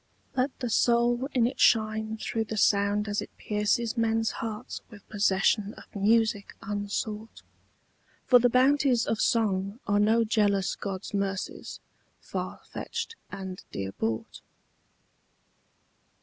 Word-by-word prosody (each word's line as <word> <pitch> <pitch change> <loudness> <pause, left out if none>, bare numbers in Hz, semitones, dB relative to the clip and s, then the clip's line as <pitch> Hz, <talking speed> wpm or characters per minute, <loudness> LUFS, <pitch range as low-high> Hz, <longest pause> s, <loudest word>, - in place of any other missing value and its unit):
Let 260 +1 0
the 245 - -1
soul 240 +3 +3
in 245 -3 +3
it 245 - -2
shine 220 -1 +3
through 225 0 -2
the 220 0 -5
sound 205 +1 +3
as 205 0 -1
it - - -7
pierces 215 +3 0
Men's 225 -1 +1
hearts 215 -2 -5
with 205 -2 -14
possession 205 +1 +2
of - - -15
music 210 0 +2
unsought; 210 +1 -4 0.8
For 250 - +7
the 245 +1 +4
bounties 260 0 +3
of 220 - -1
song 200 -1 +1
are 205 0 +2
no 220 +3 +4
jealous 205 -3 +2
god's 195 0 -5
mercies, 195 -1 -3 0.4
Far - - -5
fetched 455 - -4 0.2
and 190 -2 -7
dear 95 -1 -4
bought. 110 +3 -3
215 Hz, 125 wpm, -28 LUFS, 200-230 Hz, 0.8 s, For